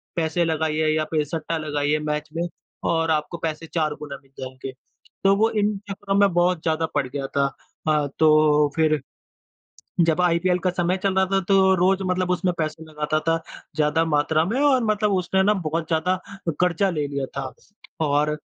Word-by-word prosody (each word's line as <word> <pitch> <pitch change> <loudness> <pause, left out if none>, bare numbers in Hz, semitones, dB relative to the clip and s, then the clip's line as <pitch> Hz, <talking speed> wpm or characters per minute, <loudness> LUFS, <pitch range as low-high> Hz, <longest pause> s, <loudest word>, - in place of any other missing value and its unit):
पैसे 165 +1 0
लगाइए 155 -1 0
या 155 - +1
फिर 155 -2 +2
सट्टा 165 +2 -3
लगाइए 150 -1 0
मैच 150 0 -3
में 170 +1 -1 0.4
और 165 -1 +1
आपको 155 +2 -1
पैसे 165 0 -4
4 155 -3 +1
गुना 140 -2 -7
मिल 135 - -27
जाएँगे। 130 0 -7 0.5
तो 195 0 +5
वो 220 +2 +3
इन 210 -1 0
चक्करों 195 0 -3
में 200 -2 +5
बहुत 175 -1 +2
ज़्यादा 160 0 +1
पड़ 140 -3 +1
गया 135 +1 -4
था। 140 0 +2 0.4
हाँ 150 -2 +2
तो 155 -1 +5
फिर 155 -3 +2 1.1
जब 165 +2 +2
आईपीएल 180 +1 +2
का 185 +1 0
समय 180 +1 0
चल 195 -1 +1
रहा 190 0 +4
था 195 - +3
तो 190 -1 +5
रोज़ 190 +2 +2
मतलब 185 0 0
उसमें 180 0 +1
पैसे 155 0 -3
लगता 155 0 -2
था 165 - +4 0.4
ज़्यादा 155 +2 +2
मात्रा 155 0 +2
में 230 +9 -1
और 275 -4 +4
मतलब 210 -1 +1
उसने 185 +1 +1
ना 210 +2 +4
बहुत 160 +1 -1
ज़्यादा 175 +3 +1 0.4
कर्जा 180 +2 +2
ले 150 -4 -1
लिया 140 -1 -3
था। 135 -1 -4 0.5
और 150 +1 +2
160 Hz, 180 wpm, -23 LUFS, 150-185 Hz, 1.1 s, तो